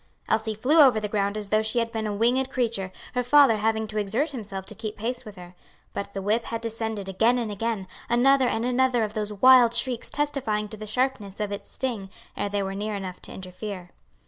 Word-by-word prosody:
Elsie 220 0 0
flew 270 +10 +3
over 255 -6 +6
the 210 - -3
ground 200 0 -1
as 210 -2 -5
though 215 +1 +3
she 220 +2 -1
had 230 -1 +1
been 220 -1 -2
a - - -2
winged 250 +5 +2
creature, 225 -8 -1 0.2
her 250 - +1
father 255 -2 +5
having 220 +1 0
to 215 0 -3
exert 225 +10 0
himself 205 -7 -6
to 205 - -3
keep 215 0 -6
pace 245 +4 -3
with 210 -2 -10
her. 180 -1 -11 0.4
But 200 0 -5
the 195 - -3
whip 220 +4 +1
had 230 0 -4
descended 225 -3 -3
again 225 +6 +2
and 230 -3 -2
again, 215 -1 -2 0.2
another 260 +2 +4
and 225 0 -1
another 250 -1 +2
of 210 -1 -3
those 210 -1 -2
wild 240 +2 +6
shrieks 240 0 0
testifying 250 -8 -1
to 215 - -8
the 215 0 -8
sharpness 220 -4 -1
of 210 -1 -2
its 200 0 -7
sting, 230 -7 -3 0.3
ere 205 - -2
they 200 0 -1
were 195 0 -3
near 210 +2 -3
enough 185 -2 -6
to - - -9
interfere. 185 0 -7
220 Hz, 225 wpm, -25 LUFS, 205-245 Hz, 0.4 s, over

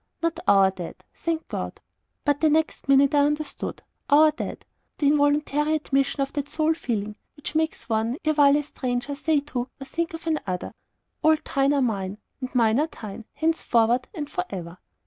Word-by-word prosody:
"Not 335 0 0
OUR 195 -1 +6
dead, 180 -3 -8
thank 330 -1 -3
God!" - - -5 0.5
But 290 -1 +2
the 315 - +5
next 315 -2 0
minute 275 +1 +5
I 290 - +5
understood. 295 +1 -1 0.3
"OUR 305 +2 +7
dead" 305 - -6 0.3
the 290 - +2
involuntary 295 +1 +2
admission 275 -2 0
of 275 - -2
that 285 -1 -3
sole 315 0 +2
feeling, 215 -8 -3 0.2
which 295 - -7
makes 315 0 -1
one, 225 +2 0
erewhile 290 -2 +5
a 295 - -1
stranger, 255 -1 -3
say 295 +1 +1
to, 255 -3 -4
or 270 - -7
think 330 +3 -3
of 325 - -10
another 200 - -2 0.5
"All 315 0 +5 0.2
thine 275 +1 +4
are 275 - +2
mine, 200 -4 -2 0.2
and 255 -1 -6
mine 230 0 +4
are 305 - +2
thine, 220 -6 -9
henceforward 250 -7 +2
and 295 -3 -4
for 180 -11 -2
ever." 175 -2 -7
280 Hz, 175 wpm, -25 LUFS, 235-310 Hz, 0.5 s, OUR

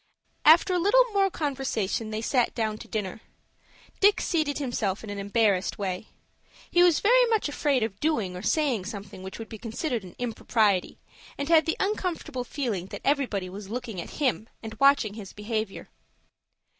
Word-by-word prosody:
After 340 +4 +7
a 360 - +2
little - - +5
more 395 -1 +3
conversation 265 - -2
they 215 +1 -4
sat 250 -1 +1
down 220 -2 -1
to - - -10
dinner. 210 -1 -4 0.8
Dick 405 +1 +5
seated 310 -4 0
himself 225 -8 -2
in 215 - -6
an 200 - -5
embarrassed 200 -2 +1
way. 190 0 -3 0.6
He 350 - +4
was 350 -3 +5
very - - +5
much 445 -6 +1
afraid 285 -4 +1
of 205 -3 -4
doing 225 -13 0
or 180 - -6
saying 265 - +1
something 200 -2 -8
which 190 0 -8
would 225 - -7
be 220 - -9
considered 235 - -3
an 180 - -12
impropriety, 220 -5 0 0.4
and 280 +2 -3
had 320 -2 +5
the 325 - 0
uncomfortable 350 -9 -2
feeling 235 -9 -3
that - - -8
everybody 260 -10 +1
was 195 +2 -9
looking 230 -5 -4
at - - -10
him, 250 -5 0
and 220 0 -6
watching 275 -7 +4
his 205 -3 -9
behavior. 215 -1 -4
230 Hz, 170 wpm, -27 LUFS, 205-300 Hz, 0.8 s, After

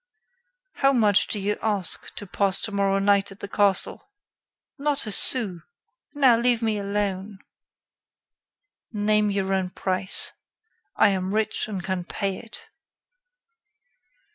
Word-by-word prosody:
"How 275 -1 +3
much 210 -5 +4
do 210 - -3
you 205 +1 -2
ask 200 -6 -3
to 205 - -7
pass 195 0 +2
tomorrow 200 -2 0
night 200 0 +2
in 195 - -12
the 200 - -7
castle?" 200 - 0 0.7
"Not 285 -2 0
a 215 - -4
sou. 205 -5 +3 0.6
Now, 260 -5 +5
leave 235 0 +1
me 220 -2 0
alone." 200 0 -3 1.5
"Name 210 -1 +1
your 195 -1 -1
own 190 -1 -1
price. 185 +1 -1 0.6
I 220 - +5
am 190 0 -2
rich 220 0 0
and 195 -4 -5
can 185 -1 -3
pay 195 +2 -3
it." 230 -2 -10
205 Hz, 125 wpm, -24 LUFS, 195-220 Hz, 1.5 s, Now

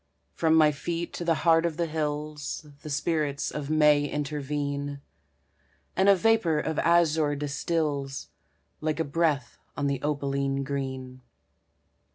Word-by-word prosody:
From 160 -1 +2
my 155 -1 +6
feet 170 +4 -4
to - - -4
the 165 -1 +2
heart 165 -1 +5
of 165 -3 -1
the 170 - +1
hills 150 -1 -3 0.2
The 155 - -8
spirits 145 -1 -1
of 150 -1 -5
May 150 -1 +4
intervene, 145 -1 -3 1.0
And 190 +1 +4
a 200 - +8
vapor 195 -6 +3
of 160 0 -2
azure 160 -3 +3
distills 145 -1 -2 0.5
Like 155 0 -1
a - - +2
breath 145 -4 0 0.2
on 145 - -1
the 140 -2 0
opaline 140 -2 -1
green. 130 -2 -4
150 Hz, 135 wpm, -27 LUFS, 140-160 Hz, 1.0 s, a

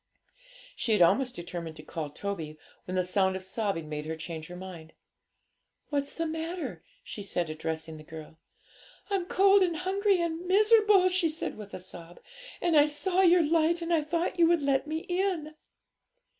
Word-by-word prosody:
She 225 - 0
had 210 - +3
almost 250 +8 +2
determined 170 -2 -6
to 155 - -11
call 155 -1 -5
Toby, 160 -2 -5 0.3
when 185 - -4
the 185 - +2
sound 190 +1 +2
of 190 - -5
sobbing 190 -4 -2
made 150 0 -5
her 160 - -3
change 160 0 -7
her 180 - -9
mind. 180 -3 -10 1.0
'What's 285 -1 -2
the 330 - -1
matter?' 325 +2 -4 0.2
she 210 - -7
said, 175 -5 -2
addressing 160 0 -5
the 155 - -11
girl. 160 0 -11 0.7
'I'm 385 -3 0
cold 395 +2 +5
and 345 -3 +1
hungry 385 +2 +1
and 340 +1 -2
miserable!' 420 -1 +5
she 360 -2 +2
said 315 - -4
with 205 -2 -9
a - - -6
sob; 175 -1 -8 0.4
'and 345 -2 +2
I 295 0 +7
saw 365 +5 0
your 355 -2 +6
light, 330 +2 +2
and 335 +1 -1
I 325 - +3
thought 340 +3 -2
you 335 - +6
would 335 -3 +2
let 275 0 +1
me 315 +1 -2
in.' 355 -4 -2
290 Hz, 180 wpm, -29 LUFS, -, 1.0 s, I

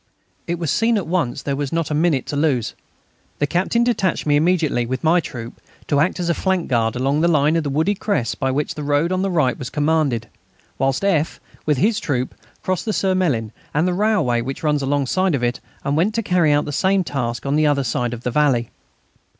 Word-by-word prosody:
It 170 - -1
was 165 -4 -2
seen 225 +8 +2
at 195 - -2
once 160 -6 -1
that - - -23
there 140 - 0
was 140 -1 -3
not 165 -2 -1
a - - +1
minute 150 -3 +1
to - - -4
lose. 140 -6 +1 0.6
The 145 - +1
Captain 185 +10 +1
detached 225 -7 0
me 145 -1 +3
immediately, 155 -5 +2
with 130 +4 -3
my 165 +3 +4
troop, 120 -7 -7 0.2
to 145 - +1
act 175 +5 +1
as 175 - -1
a 170 - +2
flank 190 0 0
guard 115 -3 +1
along 135 +4 +1
the 170 - +3
line 155 -1 +3
of 165 -3 0
wooded 160 +8 0
crests 195 - 0
by 135 - -2
which 140 +3 -1
the 150 - -6
road 145 +4 +1
on 185 0 0
the 195 - 0
right 150 -8 +1
was 130 - -5
commanded, 145 -6 0 0.5
whilst 135 +5 0
F., 165 -6 +1 0.3
with 150 -2 +2
his 210 - +2
troop, 130 -4 -2 0.3
crossed 185 +2 -1
the 215 - -1
Surmelin 175 - 0 0.2
and 160 +4 +2
the 180 - +1
railway 190 - +1
which 135 +6 -5
runs 150 -2 +1
alongside 145 +6 +1
of 125 - -3
it, 120 0 0 0.2
and 140 - 0
went 190 +8 +1
to 230 - 0
carry 175 -5 +3
out 145 0 +2
the 145 - -4
same 190 +6 +2
task 125 -7 -3
on 140 +1 +1
the 155 0 +3
other 140 -2 +2
side 120 -1 -1
of 120 -1 -7
the 125 - -1
valley. 130 -4 +2
150 Hz, 225 wpm, -20 LUFS, 135-180 Hz, 0.6 s, my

